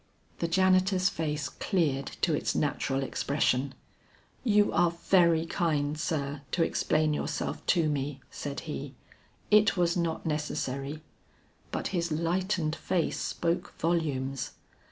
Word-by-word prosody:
The 170 - 0
janitor's 185 +1 +3
face 150 -3 -2
cleared 145 -5 0 0.2
to 165 - +3
its - - 0
natural 135 -2 0
expression. 135 0 0 0.7
"You 210 -4 +4
are 175 0 +4
very 170 -1 +3
kind, 155 -4 0
sir, 145 -2 -2
to 170 - +3
explain 155 -1 +1
yourself - - -3
to 170 -3 +3
me," 145 -1 -2
said 140 -1 -5
he; 140 -3 -6 0.6
"it 210 -1 +5
was 175 -1 +2
not 170 -2 -1
necessary." 150 -1 -3 0.7
But - - -2
his 170 -2 -1
lightened 170 0 0
face 175 -3 -1
spoke 170 +1 -1
volumes. 140 -6 -1
160 Hz, 120 wpm, -29 LUFS, 145-175 Hz, 0.7 s, it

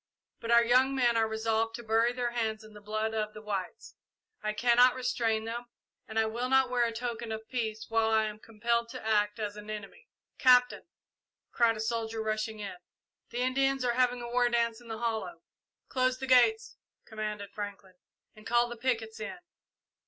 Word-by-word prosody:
But 230 - -7
our 235 0 +6
young 255 +3 +4
men 240 -3 +3
are 225 -1 +3
resolved 225 +1 -1
to 235 - -8
bury 225 +2 +2
their 245 -1 -2
hands 220 -2 -2
in 215 0 -14
the 210 - -12
blood 215 +1 -2
of 215 -1 -2
the 215 - -8
whites. 195 -4 -5 0.5
I 215 - -1
cannot 245 +3 +4
restrain 230 -3 0
them, 235 +2 -4 0.4
and 220 - -6
I 220 - +4
will 235 +3 -2
not 265 -1 +4
wear 245 -1 +3
a 230 - -1
token 235 -1 -4
of 220 0 -5
peace 220 -3 -3
while 225 0 +2
I 220 0 +3
am 215 -1 -4
compelled 230 +2 -1
to - - -8
act 210 0 +2
as 210 -2 -4
an 210 0 -10
enemy." 215 - -8 0.3
"Captain," 250 +1 +4 0.6
cried 230 -2 +3
a - - -7
soldier, 225 0 -2
rushing 215 0 -2
in, 200 -3 -6 0.5
"the 240 +1 -3
Indians 270 0 +1
are 240 - +2
having 245 0 +1
a - - -5
war 245 0 +2
dance 235 -1 0
in 240 - -15
the 225 -1 -5
hollow!" 230 +7 -3 0.4
"Close 255 -1 +1
the 265 - -5
gates," 430 - +4 0.3
commanded 210 -2 -5
Franklin, 200 -2 -7 0.4
"and 215 0 -12
call 240 0 +3
the 240 - -7
pickets 225 -3 -2
in." 215 - -5
225 Hz, 190 wpm, -30 LUFS, 220-245 Hz, 0.6 s, our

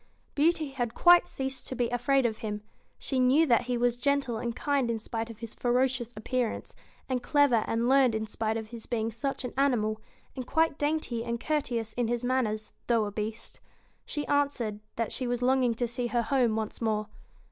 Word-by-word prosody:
AND - - -37
'i - - -39
Beauty 320 -3 +1
had 240 -4 -3
quite 350 0 +6
ceased 265 0 -4
to 260 - -4
be 245 -1 +1
afraid 245 +2 +2
of 220 -2 -1
him. 210 -1 -4 0.3
She 265 - -2
BEAST 255 - +4
knew 295 +6 +5
that 240 -6 +4
he 245 - +1
was 240 0 +2
gentle 275 -2 0
and 235 0 -3
kind 280 -4 0
in 230 - 0
spite 225 +1 -4
of 230 - -9
his 230 -1 -6
ferocious 250 -1 0
appearance; 240 +1 -2 0.3
and 255 -2 -1
clever 280 -7 +3
and 230 +1 0
learned 260 -3 +4
in 220 0 -1
spite 220 +1 -2
of 220 -1 -6
his 230 -1 -8
being 225 -2 -1
such 270 +3 -3
an 250 - -5
animal; 225 -6 +1 0.3
and 255 -2 -5
quite 320 0 +1
dainty 290 -6 -1
and 235 0 -3
courteous 240 -8 -1
in 240 -2 0
his 240 +1 -1
manners, 230 -4 0 0.2
though 230 -3 +3
a 205 - -4
Beast. 215 +2 -5 0.4
She 295 -1 -4
answered, 280 -7 0 0.2
that 230 -2 -2
she 255 - -2
was 245 0 -1
longing 255 -2 +3
to 240 +1 -1
see 240 +1 -2
her 240 0 0
home 245 -3 +2
once 220 +1 -3
more. 215 -2 0
240 Hz, 210 wpm, -29 LUFS, 225-265 Hz, 0.4 s, quite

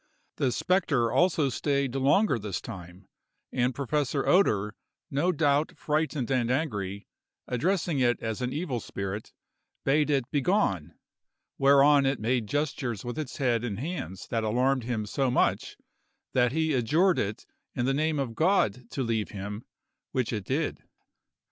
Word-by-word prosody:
The 130 -3 +1
spectre 140 -9 +1
also 155 +1 +3
stayed 140 0 0
longer 135 - +3
this 100 -3 -3
time, 90 -2 -10 0.4
and 125 0 0
Professor 140 0 -1
Oeder, 105 - +3 0.4
no 150 +6 +2
doubt 150 -2 +1
frightened 150 -5 -1
and 125 -3 +1
angry, 105 -8 -2 0.4
addressing 165 +4 0
it 120 -2 +2
as 110 +2 -4
an 125 0 -1
evil 145 -4 -2
spirit, 100 0 -5 0.5
bade 150 +2 +3
it 135 -4 +2
begone, 130 - +1 0.6
whereon 140 0 +6
it 135 -2 0
made 115 0 0
gestures 135 -5 -2
with 120 +5 -4
its 150 -5 -5
head 120 -4 +1
and 110 -5 -3
hands 130 - -5
that 115 -1 -1
alarmed 125 +3 +1
him 115 -3 -2
so 135 +5 0
much, 125 - 0 0.6
that 125 -1 +3
he 160 +1 +1
adjured 160 +10 +3
it 105 +1 -3 0.3
in 120 - 0
the 135 - +2
name 155 +2 0
of 135 -5 -2
God 125 - +1
to 135 - -2
leave 115 -3 -1
him, 105 +2 -6 0.5
which 125 -2 0
it 105 -4 -3
did. - - -1
130 Hz, 150 wpm, -28 LUFS, 115-150 Hz, 0.6 s, whereon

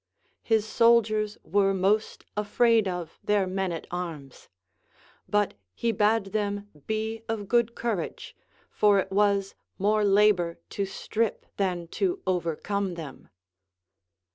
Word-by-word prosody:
His 220 -2 +2
soldiers 215 -2 +3
Avere 195 -1 +2
most 205 +4 0
afraid 220 +1 +3
of 175 -3 -5
their 205 -2 +2
men 190 0 -2
at 165 - -5
arms; 165 -7 -6 0.8
but 205 -1 +2 0.2
he 230 - 0
bade 210 -1 +1
them 205 -1 -1 0.2
be 220 +1 -2
of 215 -3 -3
good 235 +1 +2
courage, 225 -7 -3 0.4
for 205 -1 +4
it 195 - -1
Avas 200 -1 +2 0.2
more 210 +2 +2
labor 200 -4 +3
to 200 -1 -2
strip 220 +3 -2
than 180 -4 -1
to 370 - -1
OA 180 -1 +1
ercome 185 +3 -2
them. 155 -6 -9
205 Hz, 125 wpm, -27 LUFS, 190-215 Hz, 0.8 s, for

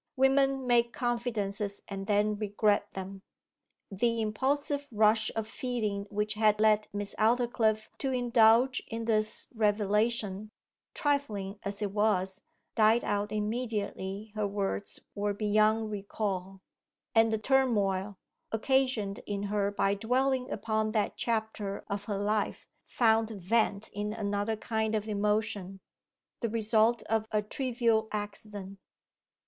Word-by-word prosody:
Women 270 0 +3
make 235 -1 +3
confidences 215 -5 -2
and 195 0 -6
then 210 0 +2
regret 205 0 +1
them. 190 0 -6 0.7
The 230 +4 +1
impulsive 280 +6 -1
rush 220 0 +3
of 220 -1 -2
feeling 220 -5 -3
which 210 +1 -1
had 215 -1 +3
led 215 -1 +4
Miss 205 0 -4
Aldclyffe 220 -1 +2
to 270 - -1
indulge 245 0 +4
in 225 0 -4
this 215 -1 0
revelation, 210 -1 +1 0.5
trifling 215 -9 -1
as 200 +1 -4
it 200 - -2
was, 200 -2 +1 0.3
died 220 +1 +4
out 205 0 -1
immediately 210 -2 -3
her 215 -1 -1
words 200 0 -3
were 205 0 -1
beyond 215 +1 +2
recall; 195 -2 -4 0.5
and 225 0 +5
the 220 - +1
turmoil, 210 -6 +1 0.3
occasioned 225 -4 +1
in 200 -1 -2
her 200 -1 +2
by 200 -1 +1
dwelling 255 +5 0
upon 215 0 -1
that 210 -3 0
chapter 220 -3 -2
of 200 0 -4
her 205 -2 -2
life, 205 +1 -1 0.2
found 225 -2 +3
vent 210 +1 0
in 210 +1 -3
another 205 0 -1
kind 220 0 -1
of 215 0 -2
emotion 210 -2 -1 0.6
the 230 - -1
result 225 +1 +2
of 220 0 0
a 210 -1 +1
trivial 230 -1 0
accident. 205 -2 -6
215 Hz, 125 wpm, -30 LUFS, 205-230 Hz, 0.7 s, and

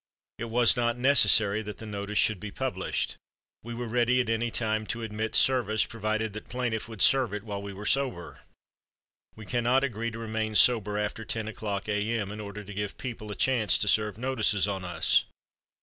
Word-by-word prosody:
It 115 - -3
was 115 0 +4
not 120 0 0
necessary 110 -5 +5
that 105 -1 -7
the 110 - -9
notice 105 0 -4
should 110 -3 +2
be 105 - -6
published. - - -3 0.4
We 120 +1 -7
were 120 0 -4
ready 120 +2 +2
at 120 -3 0
any 115 +1 0
time 110 -1 -1
to 115 0 -4
admit 110 0 -3
service, 110 -5 +3
provided 110 -1 -2
that 110 - -9
plaintiff 120 -3 -3
would 110 -4 0
serve 130 -6 +4
it 105 - -5
while 100 -3 -5
we 100 0 -7
were 100 +2 -9
sober. 130 -8 -1 1.0
We 110 - -11
cannot 120 +4 +1
agree 115 -3 -2
to 115 - -8
remain 110 -1 -3
sober 105 -3 +4
after 105 +1 -3
ten 110 +1 -4
o'clock 105 -2 -4
a. 105 +2 0
m. 100 -2 -4
in 105 - -7
order 105 0 -7
to 105 +1 -9
give 105 0 -4
people 115 -4 -6
a 105 - -5
chance 120 -5 +2
to 105 - -2
serve 105 0 +2
notices 110 -5 +1
on 95 -2 -3
us. 85 -2 +2
110 Hz, 195 wpm, -28 LUFS, 105-120 Hz, 1.0 s, necessary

